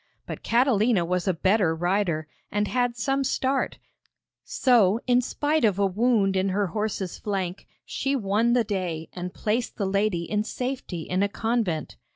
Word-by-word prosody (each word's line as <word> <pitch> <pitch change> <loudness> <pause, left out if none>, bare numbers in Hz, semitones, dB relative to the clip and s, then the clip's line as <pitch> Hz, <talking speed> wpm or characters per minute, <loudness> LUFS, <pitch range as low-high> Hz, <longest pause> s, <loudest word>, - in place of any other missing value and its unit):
But - - -7
Catalina 230 -5 +2
was 180 +2 -1
a 185 - +3
better 185 -1 +2
rider, 175 -2 0 0.2
and 205 0 0
had 245 0 0
some 270 +4 0
start, 265 0 0 0.7
so, 225 -5 +3
in 245 -1 +4
spite 295 +4 0
of 205 -4 +3
a 200 - +2
wound 200 0 +2
in 190 +1 +1
her 200 +2 +1
horse's 210 -4 -3
flank, 195 -3 -3 0.2
she 275 +1 -1
won 225 +1 +1
the 245 -1 +3
day 180 -6 -3
and 180 0 -5
placed 225 +5 -2
the 200 - -1
lady 195 -2 0
in 210 +4 -1
safety 250 -7 -4
in 185 +3 -1
a 200 - +2
convent. 220 -8 -2
205 Hz, 165 wpm, -25 LUFS, 185-240 Hz, 0.7 s, in